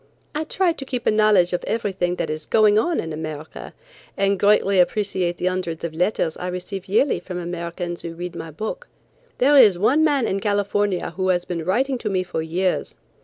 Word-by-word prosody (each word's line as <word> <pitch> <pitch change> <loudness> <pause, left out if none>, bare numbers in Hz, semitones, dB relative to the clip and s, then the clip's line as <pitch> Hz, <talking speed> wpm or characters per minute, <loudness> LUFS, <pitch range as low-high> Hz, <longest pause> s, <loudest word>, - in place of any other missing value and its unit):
I 305 +1 -2
try 370 +2 +1
to 320 - -6
keep 255 -2 -4
a - - +4
knowledge 210 -5 +4
of 180 - -1
everything 190 -5 -1
that 160 -3 -3
is 155 0 -6
going 215 -1 +4
on 340 +8 0
in 160 -1 -4
America 155 0 -7 0.5
and 195 -1 +1
greatly 200 -1 +3
appreciate 185 -2 +1
the - - -3
hundreds 185 -3 -2
of 170 -2 -3
letters 170 -1 0
I 180 - -5
receive 180 +1 -5
yearly 220 +8 +2
from 180 -2 -7
Americans 175 0 -4
who 165 -1 -7
read 175 +1 -6
my 165 0 -6
books. 220 - -6 0.5
There 280 +4 +4
is 215 -10 +7
one 265 - +3
man 285 -5 +2
in 195 - -1
California 205 -1 0
who 185 0 -2
has 180 -1 +1
been 170 -2 -4
writing 255 - 0
to 220 - -3
me 185 -2 0
for 175 -3 -4
years. 180 +4 -1
185 Hz, 200 wpm, -22 LUFS, 175-215 Hz, 0.5 s, is